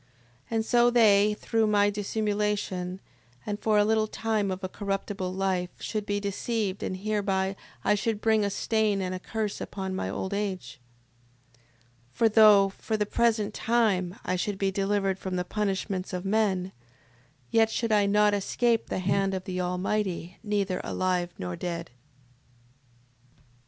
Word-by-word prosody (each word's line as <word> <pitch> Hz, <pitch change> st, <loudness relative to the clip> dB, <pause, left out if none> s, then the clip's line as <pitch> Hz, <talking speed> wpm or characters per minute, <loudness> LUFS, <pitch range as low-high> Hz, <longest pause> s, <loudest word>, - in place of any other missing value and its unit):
And 225 Hz, -1 st, 0 dB
so 240 Hz, +1 st, +4 dB
they, 210 Hz, -3 st, +5 dB
through 225 Hz, -1 st, +1 dB
my 205 Hz, -1 st, +3 dB
dissimulation, 205 Hz, -3 st, -2 dB, 0.5 s
and 205 Hz, -1 st, -3 dB
for 215 Hz, -1 st, +2 dB
a 205 Hz, -, +5 dB
little 220 Hz, 0 st, +2 dB
time 215 Hz, -2 st, -1 dB
of 190 Hz, +1 st, -4 dB
a -, -, -1 dB
corruptible 195 Hz, -1 st, -3 dB
life, 185 Hz, -1 st, -1 dB
should 215 Hz, -2 st, -4 dB
be 205 Hz, 0 st, 0 dB
deceived, 200 Hz, 0 st, -2 dB
and 185 Hz, -, -3 dB
hereby 195 Hz, -1 st, -1 dB, 0.3 s
I -, -, +3 dB
should 215 Hz, +1 st, -1 dB
bring 220 Hz, -1 st, +3 dB
a 200 Hz, -, +1 dB
stain 215 Hz, 0 st, +1 dB
and 185 Hz, -1 st, -2 dB
a 185 Hz, -, -4 dB
curse 215 Hz, +1 st, -3 dB
upon 190 Hz, -1 st, -4 dB
my 190 Hz, -, -2 dB
old 190 Hz, -, -3 dB
age. 195 Hz, -8 st, -3 dB, 1.3 s
6:26. -, -, -28 dB
For 230 Hz, -, +4 dB
though, 210 Hz, -2 st, +7 dB
for 220 Hz, +3 st, -3 dB
the 210 Hz, -, +1 dB
present 220 Hz, -1 st, +1 dB
time, 205 Hz, -6 st, +1 dB
I 185 Hz, -, 0 dB
should 200 Hz, +2 st, -2 dB
be 195 Hz, 0 st, 0 dB
delivered 195 Hz, -1 st, 0 dB
from 185 Hz, -1 st, -4 dB
the 180 Hz, 0 st, -1 dB
punishments 195 Hz, -1 st, -2 dB
of 180 Hz, +1 st, -3 dB
men, 195 Hz, -3 st, +1 dB, 0.8 s
yet 225 Hz, -1 st, +4 dB
should 230 Hz, 0 st, -1 dB
I 205 Hz, -1 st, +4 dB
not 210 Hz, +1 st, +4 dB
escape 225 Hz, +3 st, +1 dB
the -, -, -2 dB
hand 195 Hz, +1 st, +1 dB
of 185 Hz, -, -4 dB
the 185 Hz, -1 st, -3 dB
Almighty 180 Hz, 0 st, -2 dB
neither 200 Hz, -4 st, -1 dB
alive 180 Hz, -1 st, -1 dB
nor 90 Hz, -1 st, -4 dB
dead. 170 Hz, -, -5 dB
6:27. -, -, -30 dB
200 Hz, 160 wpm, -27 LUFS, 185-215 Hz, 1.3 s, though